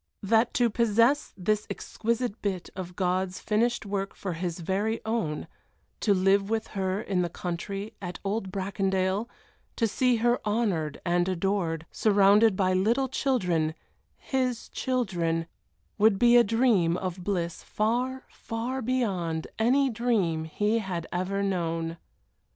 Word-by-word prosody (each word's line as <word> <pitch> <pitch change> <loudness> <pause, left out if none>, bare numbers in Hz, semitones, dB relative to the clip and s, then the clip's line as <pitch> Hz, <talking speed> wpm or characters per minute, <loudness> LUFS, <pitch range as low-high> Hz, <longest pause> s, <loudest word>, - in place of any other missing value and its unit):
That 225 +4 +2
to 240 -2 +3
possess 235 +5 +3
this 210 +3 0
exquisite 235 0 -2
bit 190 -4 -3
of 180 -2 -6
God's 185 0 0
finished 230 +2 0
work 195 -1 -3
for 190 -3 -4
his 170 +1 -3
very 205 +6 -1
own, 220 -10 -2 0.5
to 205 -2 +3
live 195 +2 +3
with 225 0 -1
her 190 -1 -1
in 195 -4 -1
the 175 - -1
country, 195 +5 -5
at 180 -2 -5
old 195 -1 -2
Bracondale, 190 +2 -1 0.5
to 230 - +2
see 250 +3 +2
her 240 +2 +2
honored 205 -9 0
and 175 +1 +2
adored, 175 -3 -1
surrounded 205 0 +4
by 185 -1 +2
little 230 +8 +2
children 180 - 0 0.4
his 255 -3 -2
children 175 -10 -1 0.5
would 215 -1 +5
be 240 +3 +5
a 240 - +8
dream 210 -7 +2
of 185 -1 -4
bliss 175 -4 -2
far, 250 +5 -1
far 240 +4 -4
beyond 195 -10 -1
any 265 +5 +4
dream 210 -9 0
he 210 +7 0
had 180 -5 -4
ever 190 +3 -1
known. 165 -3 -1
200 Hz, 135 wpm, -27 LUFS, 180-230 Hz, 0.5 s, a